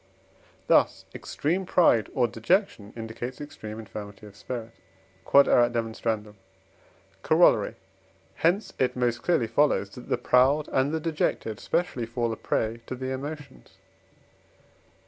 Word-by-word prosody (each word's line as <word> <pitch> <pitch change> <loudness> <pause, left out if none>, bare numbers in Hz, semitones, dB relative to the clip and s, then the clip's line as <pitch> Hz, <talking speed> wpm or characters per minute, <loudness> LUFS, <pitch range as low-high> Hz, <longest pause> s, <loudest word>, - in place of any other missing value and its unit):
Thus - - +3
extreme 175 +6 -2
pride 120 - +3
or 125 -2 +3
dejection 115 - 0
indicates 115 +3 -6
extreme 110 -7 -8
infirmity 105 -1 -9
of 100 -1 -13
spirit. 115 +1 -6 0.6
Q.E.D. 115 -5 +3 0.9
Corollary. - - +4 0.6
Hence 180 +6 +1
it 125 -1 +1
most 120 -1 0
clearly 170 -9 +2
follows, 115 -4 +1
that 125 - -12
the - - +1
proud 130 +4 +3
and 135 +2 +1
the 160 - -1
dejected 150 -9 -2
specially 130 -9 -1
fall 115 0 -2
a - - -4
prey 115 +1 -2
to - - -4
the 130 +1 -4
emotions. 145 +1 -8
125 Hz, 120 wpm, -26 LUFS, 115-145 Hz, 0.9 s, Corollary